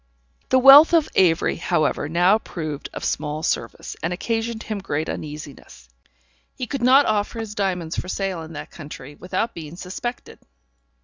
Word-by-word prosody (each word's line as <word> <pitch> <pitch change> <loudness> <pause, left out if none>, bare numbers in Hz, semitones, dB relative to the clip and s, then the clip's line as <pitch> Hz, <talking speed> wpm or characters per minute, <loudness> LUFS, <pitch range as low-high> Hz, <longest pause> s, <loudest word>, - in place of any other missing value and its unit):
The 260 - +4
wealth 280 +6 +9
of 320 -2 +3
Avery, 170 -3 +3
however, 155 -4 0
now 180 +6 +4
proved 155 -8 -6
of - - -6
small 150 +1 -2
service, - - -3
and 165 - -2
occasioned 225 +4 -2
him 215 -2 -4
great 155 -5 -3
uneasiness. 150 0 -8 0.7
He 255 - -4
could 275 +1 -4
not 260 +4 +6
offer 210 +1 -1
his 220 -2 -5
diamonds 180 -5 -2
for - - -6
sale 190 -2 -3
in 160 0 -9
that 150 - -8
country 145 -3 -10
without 185 +8 -3
being 160 -1 -8
suspected. 220 +7 -6
185 Hz, 160 wpm, -22 LUFS, 160-230 Hz, 0.7 s, wealth